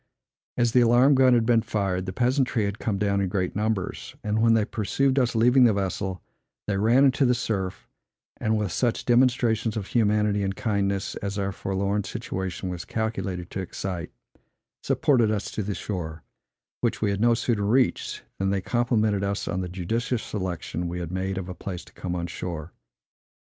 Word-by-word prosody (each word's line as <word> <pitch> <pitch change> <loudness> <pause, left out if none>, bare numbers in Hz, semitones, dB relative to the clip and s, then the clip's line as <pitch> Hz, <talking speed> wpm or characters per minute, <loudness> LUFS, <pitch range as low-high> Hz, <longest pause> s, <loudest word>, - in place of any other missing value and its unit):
As 120 -1 +3
the 125 - +5
alarm 120 +4 +5
gun 130 -2 +5
had 115 -2 +2
been 115 -1 +4
fired, 95 -4 -1
the - - -2
peasantry 125 0 +1
had 100 +1 -3
come 105 -3 -1
down 100 0 +1
in 95 - 0
great 90 -2 -1
numbers; 105 -2 -2
and 110 +1 0
when 115 0 +5
they 110 -2 +2
perceived 130 +6 +1
us 120 -2 +1
leaving 125 +3 +5
the 115 - +5
vessel, 95 -2 -2 0.4
they 100 - -1
ran 115 +7 +5
into 135 +1 +3
the 125 -1 +4
surf, 100 -6 -3 0.5
and, 110 0 +1
with 105 -4 -1
such 120 +7 0
demonstrations 120 -3 +2
of 105 - -3
humanity 105 -2 +2
and 95 -1 -1
kindness 100 -3 -1
as 100 0 -4
our 100 -1 -1
forlorn 100 +2 -1
situation 95 0 -4
was 90 -2 -5
calculated 100 -6 -3
to 95 - -3
excite, 90 -1 -5 0.7
supported 120 -6 +2
us 105 -2 -2
to - - -3
the 100 -1 -3
shore, 80 -5 -5 0.6
which 115 -2 0
we 105 - +2
had 100 0 -2
no 120 0 +5
sooner 115 -2 0
reached, 125 +5 +1 0.2
than 95 0 +1
they 100 0 +1
complimented 110 -2 +1
us 100 +1 -2
on 95 -1 -1
the 90 - -4
judicious 110 +7 -2
selection 90 -3 -4
we 85 +1 -4
had 85 -1 -5
made 95 +1 -2
of 95 -2 -4
a 90 - -5
place 90 -1 -6
to - - -18
come 90 -1 -4
on 85 -1 -2
shore. 85 -1 -6
105 Hz, 185 wpm, -25 LUFS, 95-115 Hz, 0.7 s, the